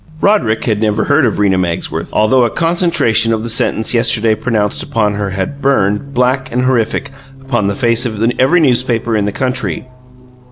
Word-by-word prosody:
Roderick 140 - +1
had 110 -3 -1
never 110 0 0
heard 140 -2 +2
of 110 - -2
Rena 95 -2 +1
Magsworth, 85 -2 -3
although 115 +4 +2
a 120 - +1
concentration 165 - +1
of 110 -1 -1
the 115 - -4
sentence 110 0 0
yesterday 115 -2 +3
pronounced 110 -2 -1
upon 110 -7 -1
her 100 -1 -3
had 95 +9 -5
burned, 135 0 0
black 130 +2 0
and 125 +1 -1
horrific, 130 +2 -1 0.3
upon 120 -6 -2
the 100 - -2
face 115 +1 +1
of 110 -3 -6 0.2
every 165 +7 +3
newspaper 120 -4 +1
in 105 -2 0
the 105 - -2
country. 130 +2 -3
115 Hz, 175 wpm, -14 LUFS, 105-130 Hz, 0.3 s, yesterday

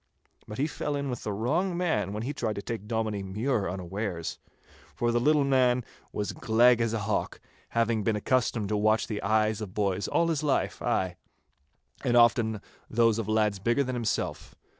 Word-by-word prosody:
But 105 - -7
he 140 - +1
fell 150 -1 -3
in 140 -2 -2
with 120 - -5
the 105 - -3
wrong 160 - 0
man 110 - 0
when 105 +2 -4
he 140 +5 -3
tried 110 -6 -2
to 100 - -4
take 110 -3 -5
Dominie 110 -2 -1
Mure 105 +2 -1
unawares, 90 -1 -4 0.6
for 120 0 +1
the 120 - +2
little 150 +3 +3
man 125 -3 +3 0.3
was 105 - -2
as - - -13
gleg 120 +1 +4
as 115 -1 +1
a 115 - -1
hawk, 105 +1 -2 0.3
having 115 -2 +1
been 110 +1 +1
accustomed 110 -1 0
to 105 - +1
watch 110 +1 +2
the 105 -3 -4
eyes 110 +1 +1
of 100 -4 -7
boys 100 -2 0
all 170 0 +2
his 155 -3 0
life, 145 -3 0
ay, 90 -2 0 0.9
and 120 -3 +3
often 115 -3 +4 0.3
those 115 -1 +3
of 110 - -3
lads 105 -2 +1
bigger 120 +7 +2
than 130 -1 -3
himself. 120 -3 -2
110 Hz, 190 wpm, -28 LUFS, 105-125 Hz, 0.9 s, gleg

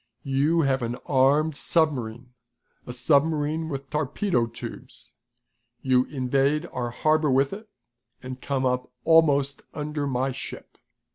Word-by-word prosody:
"You 145 +4 +2
have 135 -3 +1
an 120 0 -2
armed 145 +3 +3
submarine 125 -8 -1 0.5
a - - -4
submarine 150 +4 +1
with 135 -2 -6
torpedo 150 - 0
tubes. 115 - -10 0.7
You 130 -1 +3
invade 140 +3 0
our 120 -1 -2
harbor 155 +5 +1
with 135 +3 +2
it, 215 +2 -9 0.5
and 130 0 -7
come 135 -2 -1
up 125 0 -1
almost 145 -4 +4
under 150 -1 -3
my 130 0 0
ship. 130 - -9
140 Hz, 125 wpm, -25 LUFS, 130-155 Hz, 0.7 s, almost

